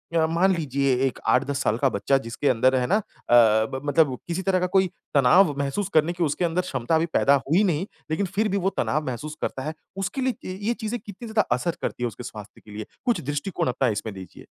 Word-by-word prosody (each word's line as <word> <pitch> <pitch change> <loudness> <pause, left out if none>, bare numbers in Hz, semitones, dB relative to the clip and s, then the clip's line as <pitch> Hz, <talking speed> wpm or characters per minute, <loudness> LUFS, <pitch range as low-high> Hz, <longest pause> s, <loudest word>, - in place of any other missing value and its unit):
अ, 160 - +4
मान 170 +4 +2
लीजिए 140 -4 0
एक 130 - -2
8-10 140 +2 +2
साल 110 - +1
का 135 +1 +2
बच्चा 115 +7 +1 0.2
जिसके 145 - -1
अंदर 130 +2 +3
है 125 -1 +1
ना 200 - +3
अ 135 - -5
अ, 110 -2 +6
ब 130 - -3
मतलब 145 -3 +2
किसी 175 +2 -2
तरह 190 -1 +1
का 180 - 0
कोई 190 -1 +5 0.3
तनाव 145 +5 +5
महसूस 175 +8 -2
करने 155 +2 +3
की 175 -1 -1
उसके 160 +4 0
अंदर 170 +2 0
क्षमता 140 -3 -1
अभी 160 +1 +2
पैदा 140 - +4
हुई 170 +8 +3
नहीं, 175 -3 0 0.3
लेकिन 180 +6 0
फिर 215 +2 +2
भी 200 - 0
वो 195 0 +1
तनाव 155 +2 0
महसूस 140 +5 -5
करता 130 - -3
है, 155 +2 -3 0.2
उसके 195 +7 -3
लिए 235 -7 -3
ये 240 - +2
चीजें 230 +1 -4
कितनी 210 +3 -10
ज़्यादा 220 -1 +1
असर 165 +7 -2
करती 125 - -3
है - - +2
उसके 120 +2 -8
स्वास्थ्य 105 -5 -10
के 105 - -13
लिए? 105 +1 -6 0.2
कुछ 240 - +1
दृष्टिकोण 145 +4 -2
अपना 125 +1 +1
इसमें 110 0 -4
दीजिए। 95 -2 -11
150 Hz, 235 wpm, -24 LUFS, 130-185 Hz, 0.3 s, अ